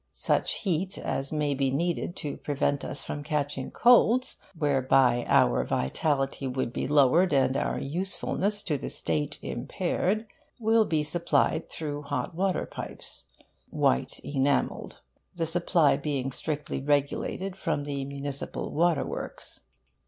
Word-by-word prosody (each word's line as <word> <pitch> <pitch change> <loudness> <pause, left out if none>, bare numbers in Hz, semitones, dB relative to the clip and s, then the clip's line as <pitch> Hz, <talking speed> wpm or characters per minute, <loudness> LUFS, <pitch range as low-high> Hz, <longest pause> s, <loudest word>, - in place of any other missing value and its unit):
Such - - 0
heat 185 -1 -1
as 135 0 -2
may 150 -2 0
be 135 -1 +1
needed 170 +5 -1
to 145 - -4
prevent 145 -1 -1
us 135 - -4
from 145 - -5
catching 145 -3 -2
colds 245 +1 +4 0.2
(whereby 135 -4 +3
our - - +4
vitality 135 - 0
would 130 -2 -2
be - - -2
lowered, 150 +6 +4
and 135 -1 +3
our - - -1
usefulness 190 +5 -1
to 150 -6 -1
the - - -5
State 145 -1 0
impaired) 185 - -1 0.3
will 225 0 +4
be 155 -5 +1
supplied 170 0 +1
through 145 -2 -4
hot 140 -2 -3
water 185 +2 0
pipes - - -2 0.4
(white 65 - +1
enamelled), 140 -1 -1 0.3
the 165 -1 -1
supply 165 -3 +3
being 140 -2 -2
strictly 150 +1 -3
regulated 145 +6 -1
from 145 -6 -2
the 140 -1 -3
municipal 140 0 -3
water 165 -3 +2
works. - - -5
145 Hz, 130 wpm, -28 LUFS, 135-170 Hz, 0.4 s, colds